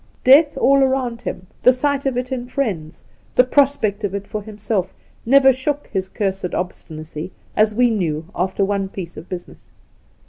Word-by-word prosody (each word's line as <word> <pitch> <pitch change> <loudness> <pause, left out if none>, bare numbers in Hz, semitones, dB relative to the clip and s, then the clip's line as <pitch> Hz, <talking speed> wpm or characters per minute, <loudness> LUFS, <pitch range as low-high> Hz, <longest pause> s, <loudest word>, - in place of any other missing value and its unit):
Death 285 +4 +6
all 275 +1 +4
round 260 -3 0
him, 185 - -5 0.2
the 255 - +7
sight 275 +2 0
of 260 -2 -1
it 250 +1 -3
in 245 -2 -3
friends, 195 - -3 0.3
the 250 - +7
prospect 255 -6 +2
of 200 -1 -2
it 200 0 -4
for 210 +1 -5
himself, 205 -2 -3 0.3
never 270 +1 +6
shook 285 +3 -2
his 190 -1 -2
cursed 190 -3 -2
obstinacy; 160 -2 -6 0.2
as 215 0 +3
we 245 0 +4
knew, 165 -7 -1
after 190 +2 0
one 195 -1 -1
piece 180 -3 -7
of 160 - -10
business. 180 -2 -9
215 Hz, 170 wpm, -20 LUFS, 190-260 Hz, 0.3 s, the